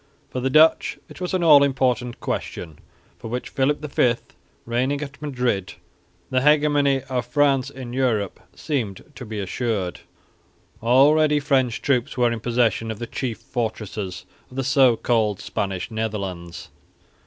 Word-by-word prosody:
For 130 - -3
the 130 +1 0
Dutch 155 +4 +4
it - - -12
was 180 +1 -1
an 180 - 0
all 150 -4 +8
important 130 -3 +1
question, 80 -4 -5 0.4
for - - -8
with 125 +2 -3
Philip 145 +1 0
V 125 -4 +2 0.5
reigning 130 +4 0
at 140 -1 -9
Madrid 125 -9 -1 0.6
the 130 0 +2
hegemony 145 -2 +3
of 130 -3 -2
France 135 0 +2
in 130 -3 -8
Europe 120 -7 0 0.2
seemed 120 - -3
to 130 - -9
be 105 -1 -5
assured. 100 -2 -2 0.8
Already 145 +5 +4
French 130 -4 +1
troops 135 0 0
were 120 -1 +3
in 115 - -3
possession 115 -1 +1
of 110 - -4
the 120 - -5
chief 120 -1 -4
fortresses 110 -6 -4 0.2
of 125 - -14
the 135 - -1
so 130 -3 +4
called 110 -5 +1
Spanish 95 -3 -3
Netherlands. 100 -6 -4
125 Hz, 145 wpm, -23 LUFS, 110-140 Hz, 0.8 s, all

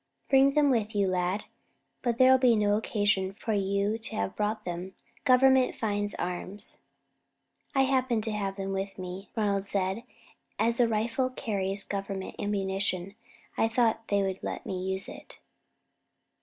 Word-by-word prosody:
"Bring 275 +1 +5
them 290 -2 +4
with 220 -3 0
you, 200 -1 +2
lad; 185 +2 0 0.6
but 240 -2 0
there 260 +1 +7
was 250 -3 +4
no 205 -1 +3
occasion 205 -3 0
for 220 +2 -3
you 200 +2 0
to 225 - -7
have 100 0 -2
brought 210 +1 -1
them. 180 +2 -5 0.3
Government 260 0 +5
finds 205 -2 -1
arms." 180 +3 -3 1.0
"I 270 - +5
happened 255 -4 +1
to 220 - -2
have 200 -2 -2
them 195 0 -4
with 195 0 -3
me," 185 +1 -7
Ronald 200 -3 0
said, 190 -1 0
"and 235 - -10 0.5
as 230 +1 +2
the 240 - +4
rifle 230 +4 0
carries 200 -5 -2
Government 195 -1 -4
ammunition, 195 -2 -1 0.4
I 225 - +3
thought 225 -1 +1
they 200 -1 +2
would 190 -1 -2
let - - -5
me 185 -1 -3
use 190 +1 -3
it." - - -11
205 Hz, 155 wpm, -29 LUFS, 195-230 Hz, 1.0 s, there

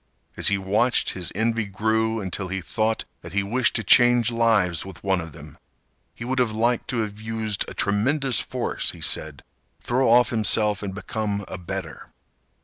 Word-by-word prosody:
As - - +3
he 100 - +4
watched 105 +6 +1
his 90 -3 -4
envy 115 +1 0
grew 110 +3 0
until 95 0 -3
he 95 +1 -3
thought 110 +5 -1 0.2
that - - -10
he 100 0 +1
wished 120 +5 +1
to 115 - 0
change 120 0 +5
lives 110 -8 +2
with 95 -2 -11
one 95 -2 +1
of 80 0 -8
them. - - -13 0.6
He 115 - -7
would 130 +1 -1
have 120 -4 +1
liked 115 +2 0
to 120 -3 -1
have 105 -1 -5
used 110 -2 -2
a - - -8
tremendous 130 +6 +1
force, - - -2
he - - -13
said, 75 -3 -3 0.4
throw 130 +1 +1
off 120 0 +5
himself 105 -2 +2
and 95 -2 -5
become 105 0 -3
a 95 - -6
better. 90 - -6
110 Hz, 180 wpm, -24 LUFS, 100-115 Hz, 0.6 s, change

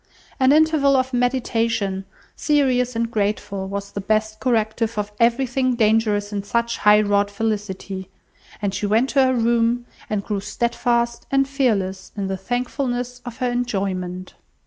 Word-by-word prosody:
An 260 0 +5
interval 305 -2 +4
of 260 0 0
meditation, 230 -6 0 0.3
serious 255 -5 +1
and 230 0 -1
grateful, 200 -2 -2
was 200 0 -5
the 200 - -4
best 215 +1 0
corrective 225 -1 0
of 210 0 -2
everything 255 +2 +2
dangerous 215 -2 +2
in 200 - -1
such 235 +3 -1
high 210 0 +6
wrought 205 -1 +2
felicity; 200 -3 -3 0.5
and 200 -2 0
she 205 - -2
went 225 +6 +2
to 275 -1 +4
her 260 0 +2
room, 235 +1 +2 0.2
and 210 -2 -1
grew 210 -2 -2
steadfast 235 +2 -1
and 275 0 +2
fearless 200 -9 -1
in 200 - -1
the 190 - -1
thankfulness 245 +3 -3
of 240 -2 -7
her 250 -1 0
enjoyment. 190 -6 -3
230 Hz, 145 wpm, -22 LUFS, 205-245 Hz, 0.5 s, high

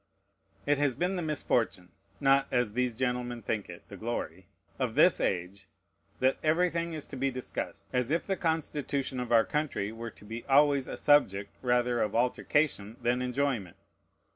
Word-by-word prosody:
It 145 0 +2
has 145 -4 +2
been 180 +2 0
the 180 - -2
misfortune 120 - -1 0.3
(not, 135 0 +4
as 125 -4 0
these 125 -1 0
gentlemen 125 -1 -2
think 105 -1 -2
it, 85 - -11
the 100 - -10
glory) 95 -5 -4 0.3
of - - -1
this - - +5
age, 95 +2 -2 0.5
that 130 +1 +2
everything 170 +1 +1
is 155 -2 -5
to - - -9
be 135 +1 0
discussed, 130 -1 -5
as 125 -1 +1
if 165 +3 0
the 195 - 0
Constitution 145 -6 -1
of 125 -1 -4
our 115 -1 +6
country 150 -9 -2
were 115 +1 -6
to 105 - -17
be 115 +2 -6
always 140 -1 +4
a - - -5
subject 100 -9 +3
rather 125 -1 +2
of 105 - -1
altercation 125 -2 +1
than 120 +1 +1
enjoyment. 125 -8 -1
125 Hz, 165 wpm, -30 LUFS, 115-145 Hz, 0.5 s, our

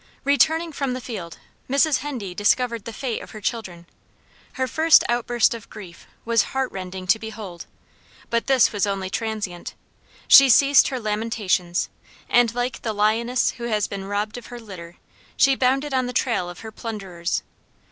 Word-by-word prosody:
Returning 320 +4 +2
from 275 -3 -2
the 255 - -4
field 205 -9 -7 0.3
Mrs. 280 +1 +3
Hendee 255 -10 -5
discovered 230 +3 +1
the 230 - -5
fate 245 0 -4
of - - -11
her - - -7
children. 195 -6 -4 0.7
Her 260 - -1
first 315 +5 +5
outburst 240 0 +1
of 230 -2 -10
grief 180 -5 -12 0.2
was 230 -2 +3 0.2
heart 265 -1 0
rending 185 0 -7
to 220 +5 +3
behold, 215 -6 -8 0.6
but 235 0 0
this 265 -4 +4
was 205 -1 0
only 195 -1 -3
transient; 210 -6 -4 0.5
she 275 -1 +9
ceased 275 +3 +6
her 260 - -3
lamentations, 210 -5 -1 0.4
and 240 -1 +3
like 245 0 -2
the 220 - -2
lioness 225 +4 +1
who 235 - -8
has 215 -3 0
been 195 -1 -6
robbed 210 +3 -3
of 240 - -14
her 245 0 -9
litter, 180 -6 -10 0.4
she 275 - +5
bounded 270 +2 +1
on 255 -1 +1
the 250 - -5
trail 230 -7 0
of 175 - -10
her 220 - -8
plunderers. 195 -7 -4
225 Hz, 165 wpm, -23 LUFS, 200-255 Hz, 0.7 s, she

